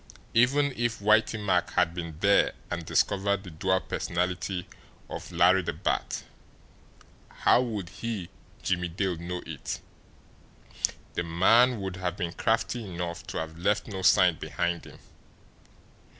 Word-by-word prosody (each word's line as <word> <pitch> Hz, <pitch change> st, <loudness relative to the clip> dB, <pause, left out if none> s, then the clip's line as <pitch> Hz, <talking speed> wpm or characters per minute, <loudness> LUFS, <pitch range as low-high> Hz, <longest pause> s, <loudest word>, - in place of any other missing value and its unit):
Even 140 Hz, +5 st, +4 dB
if 120 Hz, -1 st, 0 dB
Whitey 110 Hz, +2 st, +3 dB
Mack 95 Hz, -4 st, +1 dB
had 85 Hz, -2 st, +2 dB
been 85 Hz, -3 st, -6 dB
there 100 Hz, 0 st, +4 dB, 0.2 s
and -, -, -2 dB
discovered 100 Hz, 0 st, +1 dB
the 90 Hz, -, -9 dB
dual 95 Hz, +4 st, +1 dB
personality 90 Hz, +1 st, -2 dB, 0.4 s
of -, -, -6 dB
Larry 90 Hz, +2 st, +5 dB
the 85 Hz, -, -3 dB
Bat, -, -, -2 dB, 1.1 s
how -, -, +3 dB
would 105 Hz, -8 st, -3 dB
he, 105 Hz, -1 st, -5 dB, 0.3 s
Jimmie 90 Hz, -1 st, 0 dB
Dale, 90 Hz, +1 st, -1 dB
know 90 Hz, +2 st, -5 dB
it? 80 Hz, -4 st, -5 dB, 1.3 s
The -, -, -1 dB
man 115 Hz, +9 st, +4 dB
would 95 Hz, -1 st, -4 dB
have 90 Hz, 0 st, -3 dB
been 85 Hz, -2 st, -3 dB
crafty 115 Hz, +1 st, 0 dB
enough 85 Hz, -3 st, -5 dB
to -, -, -5 dB
have 80 Hz, +1 st, -5 dB
left 100 Hz, +4 st, +1 dB
no 95 Hz, -4 st, -5 dB
sign 90 Hz, -2 st, +5 dB
behind 85 Hz, 0 st, -2 dB
him. -, -, -12 dB
95 Hz, 135 wpm, -28 LUFS, 85-105 Hz, 1.3 s, Larry